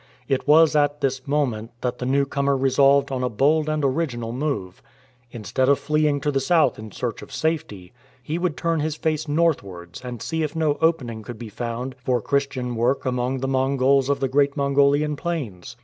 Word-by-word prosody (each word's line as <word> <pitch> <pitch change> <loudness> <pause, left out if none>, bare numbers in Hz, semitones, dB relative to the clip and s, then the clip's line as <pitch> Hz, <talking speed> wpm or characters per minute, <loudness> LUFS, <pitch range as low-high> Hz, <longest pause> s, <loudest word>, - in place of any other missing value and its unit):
It 135 +1 -1
was 155 +1 +6
at 145 0 +2
this 135 -1 -1
moment 125 -7 -1
that 125 0 -2
the 125 - -3
new 140 +1 +2
comer 140 0 0
resolved 135 +1 +3
on 130 -1 -2
a 125 - 0
bold 150 +7 +2
and 155 -2 0
original 130 -5 -1
move. 120 -9 -3 0.5
Instead 120 +3 -1
of 140 - +5
fleeing 150 -1 +1
to 145 - 0
the 135 - +1
south 155 +1 +2
in 110 0 -8
search 120 -3 -4
of - - -12
safety, 150 - -3 0.3
he 155 +6 -3
would 175 -3 -1
turn 165 -1 0
his 155 0 -1
face 155 -1 -2
northwards 100 - -1
and 125 -2 -6
see 160 +9 -3
if 155 0 -2
no 155 -3 0
opening 135 -9 0
could 115 +2 -8
be 115 0 -8
found 120 +4 -4
for 125 -1 +1
Christian 130 -1 -1
work 120 +4 0
among 125 +1 -1
the 135 - -1
Mongols 135 0 +2
of 140 - +1
the 135 - 0
great 140 +1 +2
INIongolian 140 +1 +2
plains. 140 - -5
140 Hz, 195 wpm, -23 LUFS, 125-150 Hz, 0.5 s, was